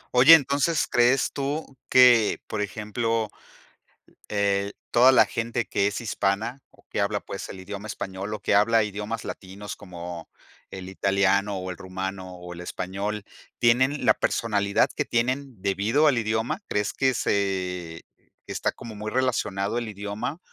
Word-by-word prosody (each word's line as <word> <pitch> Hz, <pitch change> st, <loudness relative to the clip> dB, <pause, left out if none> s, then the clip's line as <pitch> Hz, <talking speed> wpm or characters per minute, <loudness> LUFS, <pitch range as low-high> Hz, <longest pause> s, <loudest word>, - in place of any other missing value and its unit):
Oye, 135 Hz, +7 st, +10 dB
entonces, 145 Hz, +2 st, +1 dB
¿crees 125 Hz, +2 st, +3 dB
tú 145 Hz, +3 st, -2 dB, 0.2 s
que, 120 Hz, -4 st, +6 dB
por 105 Hz, -, -3 dB
ejemplo, 110 Hz, +2 st, -2 dB, 1.0 s
eh, 100 Hz, -1 st, 0 dB, 0.2 s
toda 125 Hz, +2 st, +7 dB
la 130 Hz, -, +6 dB
gente 115 Hz, +1 st, -2 dB
que 100 Hz, -, +1 dB
es 105 Hz, -, -4 dB
hispana 110 Hz, +2 st, -1 dB
o -, -, -25 dB
que -, -, -2 dB
habla, 100 Hz, +1 st, +1 dB
pues, 100 Hz, -, -7 dB
el 95 Hz, -, -8 dB
idioma 100 Hz, +3 st, -7 dB
español 95 Hz, 0 st, -5 dB
o 105 Hz, -, -3 dB
que 100 Hz, -, 0 dB
habla 110 Hz, +2 st, +4 dB
idiomas 105 Hz, +2 st, -4 dB
latinos 100 Hz, +2 st, -7 dB
como 85 Hz, -3 st, -8 dB, 0.4 s
el 95 Hz, -1 st, -8 dB
italiano, 100 Hz, +1 st, +1 dB
o 95 Hz, 0 st, -4 dB
el -, -, -10 dB
rumano 95 Hz, 0 st, -6 dB
o 90 Hz, 0 st, -9 dB
el 85 Hz, -, -8 dB
español, 100 Hz, +4 st, -4 dB, 0.3 s
tienen 130 Hz, +5 st, +3 dB
la -, -, +6 dB
personalidad 100 Hz, -3 st, +1 dB
que -, -, -1 dB
tienen 125 Hz, 0 st, -1 dB
debido 105 Hz, +11 st, +2 dB
al 130 Hz, -5 st, +4 dB
idioma? 110 Hz, -, -1 dB
¿Crees 105 Hz, 0 st, 0 dB
que 130 Hz, -1 st, +1 dB
se 90 Hz, -6 st, -1 dB, 0.4 s
está -, -, -1 dB
como 115 Hz, -2 st, -10 dB
muy 105 Hz, +1 st, -5 dB
relacionado 110 Hz, -5 st, 0 dB
el 120 Hz, -2 st, -2 dB
idioma? 105 Hz, -, -5 dB
105 Hz, 150 wpm, -25 LUFS, 100-120 Hz, 1.0 s, Oye